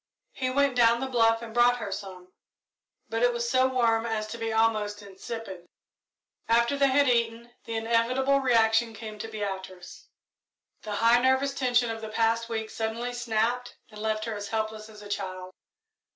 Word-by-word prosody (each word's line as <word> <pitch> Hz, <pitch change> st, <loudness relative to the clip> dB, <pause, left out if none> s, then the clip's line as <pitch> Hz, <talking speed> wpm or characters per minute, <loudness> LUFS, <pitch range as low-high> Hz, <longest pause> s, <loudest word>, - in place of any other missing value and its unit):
He 255 Hz, -1 st, -2 dB
went 280 Hz, 0 st, +2 dB
down 235 Hz, -1 st, +4 dB
the 265 Hz, -, -2 dB
bluff 230 Hz, -3 st, +2 dB
and 225 Hz, -1 st, -8 dB
brought 240 Hz, +1 st, +4 dB
her 205 Hz, -4 st, -5 dB
some, 190 Hz, -2 st, -8 dB, 0.7 s
but 225 Hz, 0 st, -3 dB
it 245 Hz, 0 st, +4 dB
was 235 Hz, 0 st, -2 dB
so 255 Hz, +2 st, +3 dB
warm 235 Hz, -3 st, +1 dB
as 220 Hz, -1 st, -2 dB
to 235 Hz, +2 st, -7 dB
be 225 Hz, 0 st, -2 dB
almost 215 Hz, -2 st, +1 dB
insipid. 195 Hz, -2 st, -8 dB, 0.8 s
After 235 Hz, +4 st, +3 dB
they 280 Hz, 0 st, +3 dB
had 280 Hz, +1 st, +3 dB
eaten, 235 Hz, -1 st, 0 dB
the 230 Hz, -, -5 dB
inevitable 235 Hz, +5 st, +2 dB
reaction 225 Hz, -3 st, +2 dB
came 215 Hz, 0 st, -8 dB
to 225 Hz, -, -5 dB
Beatrice. 190 Hz, -4 st, -7 dB, 0.7 s
The 210 Hz, -1 st, -5 dB
high 230 Hz, +3 st, +4 dB
nervous 265 Hz, +2 st, +2 dB
tension 245 Hz, -3 st, +1 dB
of 225 Hz, 0 st, -6 dB
the 220 Hz, -, -6 dB
past 230 Hz, +1 st, 0 dB
week 220 Hz, -1 st, -3 dB
suddenly 230 Hz, +2 st, -3 dB
snapped 240 Hz, +1 st, -1 dB
and 210 Hz, 0 st, -10 dB
left 215 Hz, 0 st, -1 dB
her 225 Hz, -, -3 dB
as 205 Hz, -1 st, -5 dB
helpless 220 Hz, 0 st, -3 dB
as 210 Hz, -1 st, -13 dB
a -, -, -9 dB
child. 185 Hz, -2 st, -5 dB
225 Hz, 175 wpm, -27 LUFS, 215-240 Hz, 0.8 s, down